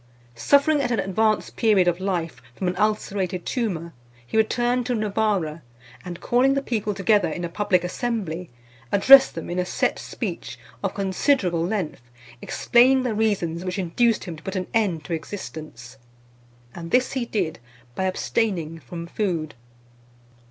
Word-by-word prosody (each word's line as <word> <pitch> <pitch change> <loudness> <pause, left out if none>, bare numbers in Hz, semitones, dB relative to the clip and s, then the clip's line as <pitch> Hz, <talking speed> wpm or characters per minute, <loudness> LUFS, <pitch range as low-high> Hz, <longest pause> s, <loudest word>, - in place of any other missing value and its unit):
Suffering, 285 - +3
at 260 - -1
an 235 -4 0
advanced 215 +3 0
period 210 -6 +3
of 175 0 +1
life, 170 -9 -2
from 185 - -2
an 180 - -1
ulcerated 195 -3 -1
tumour, 175 -9 -2 0.3
he 120 - -8
returned 240 +3 +2
to 250 - 0
Novara, 205 -7 0 0.4
and 175 -1 -7
calling 260 +3 +2
the 275 - +1
people 215 -5 -2
together 195 -2 +3
in 175 +2 -4
a - - -4
public 185 0 +1
assembly, 180 -4 -3 0.4
addressed 270 +6 +7
them 165 - -5
in 175 +1 -2
a - - +2
set 180 - -1
speech, - - -5 0.3
of - - -2
considerable 190 - +1
length, 185 - -2 0.4
explaining 255 +2 +3
the 245 -3 -1
reasons 195 -6 0
which 185 +1 -3
induced 210 +6 +1
him 175 -4 -6
to 150 - -13
put 190 +3 -5
an 185 -1 -1
end 195 -8 +1
to 160 - -5
existence: 155 - -7 0.8
and 165 -1 -7
this 250 +7 +2
he 265 -3 -1
did 185 -8 -2 0.3
by 190 - -2
abstaining 185 -4 -1
from 165 +5 -8
food. 170 -4 -2
190 Hz, 155 wpm, -24 LUFS, 170-225 Hz, 0.8 s, addressed